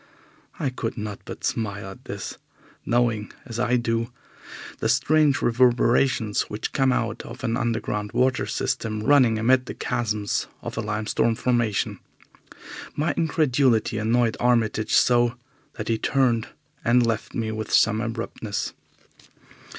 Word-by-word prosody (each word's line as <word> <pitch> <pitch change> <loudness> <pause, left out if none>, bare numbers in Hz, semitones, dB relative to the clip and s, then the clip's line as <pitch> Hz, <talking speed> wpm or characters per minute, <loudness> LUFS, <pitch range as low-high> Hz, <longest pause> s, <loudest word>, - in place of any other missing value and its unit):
I 135 - -1
could 120 -2 -4
not 105 -2 -5
but - - -8
smile 100 -3 -2
at 125 +7 -14
this, 100 -5 -6 0.5
knowing, 120 -3 +1
as 115 -2 -6
I 125 0 +2
do, 115 0 -1 0.7
the - - 0
strange 155 -2 +3
reverberations 120 -2 +2
which 105 - -4
come 135 -1 +3
out 115 -2 -1
of - - -10
an 115 -2 0
underground 105 -3 -2
water 130 0 +1
system 110 -2 -2
running 130 -4 +5
amid 125 +3 +3
the - - -6
chasms 105 -3 -1 0.2
of - - -5
a 110 - -1
limestone 110 +2 0
formation. 120 -4 0 1.0
My 155 +3 0
incredulity 135 -9 +2
annoyed 115 +1 +2
Armitage 110 -3 +2
so 120 -1 +4 0.4
that - - -6
he 115 -1 0
turned 125 -4 +1 0.4
and 120 +1 +4
left 115 -2 -2
me 110 -1 -1
with 110 0 -5
some 110 0 +4
abruptness. 115 -2 -4
115 Hz, 135 wpm, -24 LUFS, 110-125 Hz, 1.0 s, running